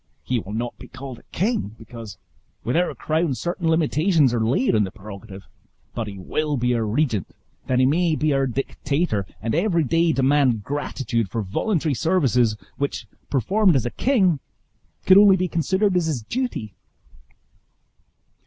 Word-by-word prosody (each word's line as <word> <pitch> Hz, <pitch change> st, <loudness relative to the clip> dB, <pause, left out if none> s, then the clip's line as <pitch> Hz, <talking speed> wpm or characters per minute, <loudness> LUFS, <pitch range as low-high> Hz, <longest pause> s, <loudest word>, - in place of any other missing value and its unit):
He 125 Hz, -1 st, 0 dB
will 105 Hz, -1 st, -8 dB
not 120 Hz, +2 st, -3 dB
be -, -, -10 dB
called 130 Hz, -3 st, -9 dB
a -, -, -23 dB
king; 195 Hz, -, -1 dB
because, 110 Hz, -3 st, -10 dB, 0.5 s
with 120 Hz, -, -1 dB
our 175 Hz, +1 st, +2 dB
own -, -, -7 dB
crown 155 Hz, -2 st, 0 dB
certain 175 Hz, +3 st, -3 dB
limitations 160 Hz, -3 st, +3 dB
are 115 Hz, -2 st, +1 dB
laid 125 Hz, +3 st, +2 dB
on 105 Hz, -, +3 dB
the 95 Hz, -, -2 dB
prerogative; 100 Hz, 0 st, -10 dB, 0.5 s
but 115 Hz, -2 st, -3 dB
he 100 Hz, -1 st, -7 dB
will 150 Hz, +10 st, -2 dB
be 125 Hz, 0 st, +1 dB
our 115 Hz, -2 st, 0 dB
regent, 115 Hz, -, 0 dB, 0.4 s
that 130 Hz, -, +1 dB
he 130 Hz, -, +4 dB
may 165 Hz, +4 st, +2 dB
be 155 Hz, -1 st, +1 dB
our 135 Hz, -1 st, +1 dB
dictator, 135 Hz, -, -2 dB, 0.2 s
and 115 Hz, -, -1 dB
every 170 Hz, -1 st, +2 dB
day 165 Hz, +4 st, +2 dB
demand 135 Hz, -5 st, +2 dB
gratitude 135 Hz, -5 st, -2 dB
for 110 Hz, +2 st, -2 dB
voluntary 155 Hz, -, 0 dB
services, 125 Hz, -8 st, +2 dB, 0.2 s
which, 140 Hz, 0 st, -3 dB, 0.2 s
performed 185 Hz, -, +3 dB
as 125 Hz, -4 st, +1 dB
a 120 Hz, -, -2 dB
king, 190 Hz, -, +2 dB, 0.7 s
could 190 Hz, +1 st, +8 dB
only 200 Hz, -2 st, +7 dB
be 185 Hz, 0 st, 0 dB
considered 190 Hz, +4 st, +1 dB
as 175 Hz, -2 st, +2 dB
his 135 Hz, -8 st, -2 dB
duty!" 230 Hz, -, -3 dB
135 Hz, 165 wpm, -23 LUFS, 115-170 Hz, 0.7 s, could